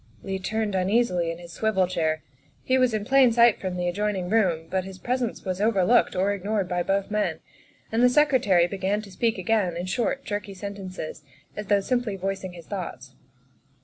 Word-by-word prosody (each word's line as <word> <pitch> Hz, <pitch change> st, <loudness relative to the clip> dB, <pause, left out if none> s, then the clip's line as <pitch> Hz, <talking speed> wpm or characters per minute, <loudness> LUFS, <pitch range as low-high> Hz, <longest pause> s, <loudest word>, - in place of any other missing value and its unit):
Leigh 190 Hz, -1 st, -3 dB
turned 215 Hz, +2 st, -2 dB
uneasily 185 Hz, -2 st, +1 dB
in 165 Hz, -, -4 dB
his 170 Hz, -1 st, -11 dB
swivel 215 Hz, -4 st, +1 dB
chair. 160 Hz, -4 st, -1 dB, 0.4 s
He 260 Hz, 0 st, +2 dB
was 255 Hz, -1 st, +3 dB
in 215 Hz, -2 st, -2 dB
plain 265 Hz, 0 st, +5 dB
sight 235 Hz, -1 st, +5 dB
from 185 Hz, -2 st, -3 dB
the 175 Hz, 0 st, -1 dB
adjoining 195 Hz, -1 st, -1 dB
room, 180 Hz, -8 st, +2 dB
but 190 Hz, -1 st, -1 dB
his 190 Hz, 0 st, -9 dB
presence 245 Hz, +3 st, -2 dB
was 185 Hz, 0 st, -2 dB
overlooked 215 Hz, 0 st, +3 dB
or 195 Hz, +2 st, +1 dB
ignored 200 Hz, 0 st, -1 dB
by 180 Hz, -1 st, -1 dB
both 195 Hz, +3 st, -1 dB
men, 210 Hz, 0 st, 0 dB, 0.5 s
and 225 Hz, +1 st, +1 dB
the 250 Hz, -, +7 dB
Secre 285 Hz, -1 st, +4 dB
tary 180 Hz, -4 st, +4 dB
began 195 Hz, +3 st, -1 dB
to 200 Hz, -, -12 dB
speak 225 Hz, +4 st, 0 dB
again 185 Hz, -2 st, 0 dB
in 175 Hz, -, -3 dB
short, 235 Hz, +8 st, -1 dB
jerky 205 Hz, -1 st, -4 dB
sentences, 190 Hz, -5 st, -7 dB, 0.3 s
as 210 Hz, -1 st, -6 dB
though 205 Hz, -1 st, +3 dB
simply 240 Hz, -1 st, -1 dB
voicing 190 Hz, -1 st, -4 dB
his 170 Hz, -2 st, -11 dB
thoughts. 145 Hz, -10 st, -6 dB
195 Hz, 190 wpm, -25 LUFS, 180-220 Hz, 0.5 s, the